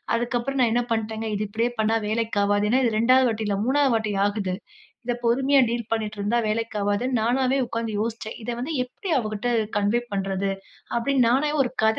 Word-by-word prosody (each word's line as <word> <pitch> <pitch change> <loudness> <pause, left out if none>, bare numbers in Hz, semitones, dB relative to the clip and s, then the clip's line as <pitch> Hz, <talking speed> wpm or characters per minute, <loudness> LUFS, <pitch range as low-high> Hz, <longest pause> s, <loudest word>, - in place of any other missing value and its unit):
அதுக்கப்புறம் 240 +3 -1
நான் 230 -2 +3
என்ன 245 0 +2
பண்டேங்க. 220 0 -3
இது 210 +1 -1
இப்டியே 230 +4 0
பண்ணா 220 +1 +2
வேலைக்கு 220 -1 -1
ஆவாது. 205 +1 +2
ஏனா, 260 +1 +4
இது 230 - +2
2வது 255 +2 +5
வாட்டி 220 -1 -2
இல்ல, 200 -1 0
3வது 280 -1 +3
வாட்டி 215 -2 -1
ஆகுது. 200 -3 -2 0.5
இத 245 - 0
பொறுமையா 270 +4 +4
டீல் 235 -1 -3
பண்ணீட்டு 215 -1 -2
இருந்தா 210 +4 +1
வேலைக்கு 225 0 -2
ஆகாதுன்னு, 225 +5 0
நானாவே 255 +3 +2
உட்கார்ந்து 230 -2 -3
யோசிச்சேன். 225 -1 -4
இத 245 - -5
வந்து 300 +6 -3
எப்டி 350 +8 -7
அவகிட்ட 215 +1 -3 0.3
கன்வே 205 +4 +2
பண்றது 195 0 -1 0.5
அப்டின்னு 255 0 +2
நானாவே 295 +4 +2
ஒரு 245 - -3
கத 220 - +3
230 Hz, 185 wpm, -24 LUFS, 215-250 Hz, 0.5 s, 2வது